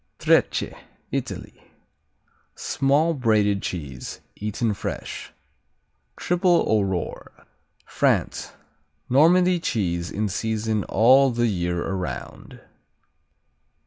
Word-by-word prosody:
Trecce - - +2 0.4
Italy - - -5 0.9
Small, 145 +5 +1
braided 105 -7 +2
cheese, 70 -8 -6 0.2
eaten 105 +2 -2
fresh. - - -6 0.9
Triple 175 0 +2
Aurore 100 -5 -2 0.4
France - - 0 0.6
Normandy 175 +6 +5
cheese 85 - -1
in 105 +1 -2
season 110 +1 -1
all 130 +6 +5
the 120 -1 0
year 90 -5 -1
around. 95 -2 -6
110 Hz, 80 wpm, -24 LUFS, 95-135 Hz, 0.9 s, Normandy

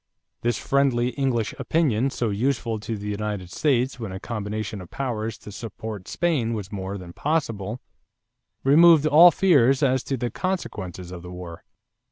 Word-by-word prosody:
This 120 -1 0
friendly 130 -3 +1
English 125 -5 -1
opinion, 135 -6 +1
so 120 -4 -2
useful 115 0 -1
to 110 +1 -4
the 105 +1 -7
United 105 -3 -4
States 130 -1 +1
when 110 -5 -5
a 95 - -6
combination 105 -1 -4
of 90 - -11
powers 115 -5 -3
to 105 - -11
support 110 -2 -7
Spain 135 -10 0
was 105 -1 -6
more 100 -1 -4
than 90 -2 -10
possible, 115 - -2 0.8
removed 155 +2 +6
all 155 +4 +8
fears 145 -7 +4
as 130 -1 +2
to 135 - -2
the 120 -1 -2
consequences 95 - -4
of 90 -1 -7
the 90 - -9
war. 90 -2 -9
115 Hz, 160 wpm, -24 LUFS, 105-135 Hz, 0.8 s, all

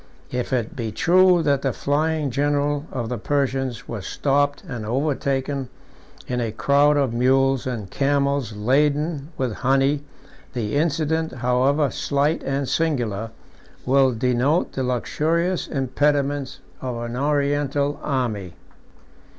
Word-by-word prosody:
If 125 +1 -3
it 120 -4 -1
be 115 -3 -3
true 180 - +4
that 140 -2 +2
the 135 - 0
flying 150 0 0
general 145 +2 0
of 120 -4 -3
the 125 -1 -3
Persians 135 -1 -1
was 110 -5 -5
stopped 145 0 0
and 120 -5 -5
overtaken 135 +1 -1 0.6
in 125 -1 -2
a 115 -2 -1
crowd 140 +6 +3
of 135 -5 +1
mules 135 +2 +2
and 115 -6 -4
camels 140 -4 0
laden 145 +6 +1
with 130 -4 -1
honey, 135 +2 +2 0.5
the 110 -2 -2
incident, 160 +1 0
however 130 +4 +2
slight 145 +3 0
and 135 0 -2
singular, 120 -11 -1 0.6
will 135 0 +4
denote 125 +7 +1
the 135 - -3
luxurious 160 +8 0
impediments 140 0 0 0.2
of 125 -2 -3
an 120 0 -5
Oriental 145 0 0
army. 110 - -2
135 Hz, 125 wpm, -23 LUFS, 125-145 Hz, 0.6 s, true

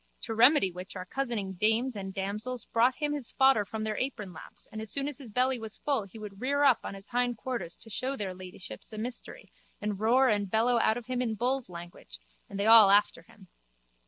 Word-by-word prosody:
To 225 - -4
remedy 235 -3 +5
which 180 +3 -9
our 185 -1 -5
cozening 225 -4 -3
dames 225 +4 +2
and 195 -1 -5
damsels 210 +6 -3
brought 240 +2 +2
him 295 +1 -2
his 285 -5 -1
fodder 265 -7 +4
in 220 -1 -3
their 215 -1 -2
apronlaps 210 -8 -6
and 220 - -6
as 220 - -3
soon 275 +4 0
as 290 -1 -6
his 260 -5 -10
belly 255 +3 +1
was 220 -1 -7
full 275 -8 -1
he 200 +3 -13
would 210 -1 -9
rear 285 +3 +1
up 270 -4 +5
on - - -6
his 195 0 -10
hind 245 -1 0
quarters 215 -9 -4
to 225 - -10
show 260 +6 -2
their 195 -4 -3
ladyships 180 - -10
a 215 - -8
mystery 240 +3 -6 0.3
and 210 -2 -3
roar 245 +5 +4
and 205 -4 +1
bellow 235 +3 +2
out 220 0 +2
of 245 - -7
him 250 0 -2
in 225 -3 -1
bulls' 250 0 -1
language 170 - -10 0.3
and 200 - -6
they 200 - 0
all 220 -2 +9
after 200 -3 +3
him. 190 +3 -19
220 Hz, 220 wpm, -29 LUFS, 200-255 Hz, 0.3 s, all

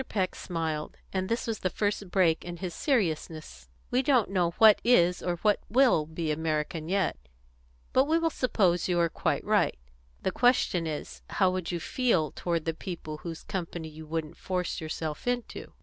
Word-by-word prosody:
Peck 190 -4 0
smiled, 160 -3 -4 0.2
and 190 -1 -1
this 230 +2 -1
was 225 -2 -2
the 185 - 0
first 205 0 -2
break 175 -4 +3
in 175 0 -6
his 180 -1 -5
seriousness. 155 - -2 0.2
"We 250 - +3
don't 255 -7 +2
know 180 -3 +2
what 220 -2 +7
is 180 -7 +4
or 175 -1 -1 0.3
will 240 - +4
be 160 0 -2
American 155 +1 -2
yet. 195 0 +1 0.8
But 260 - +5
we 320 +3 +2
will 330 -1 +1
suppose 190 - +1
you 175 -1 +2
are 170 -1 +3
quite - - -1
right. - - +2 0.5
The - - +1
question 215 -8 +2
is, 150 -2 -5
how 190 -2 +2
would 185 -2 -3
you 175 - -2
feel 180 - +1
toward 170 -2 -2
the 165 - 0
people 160 -3 -6
whose 165 +1 -7
company 170 -3 -4
you 155 0 -11
wouldn't 160 0 -4
force 180 -2 -2
yourself 155 +2 -4
into?" 245 -1 -3
175 Hz, 175 wpm, -28 LUFS, 160-205 Hz, 0.8 s, what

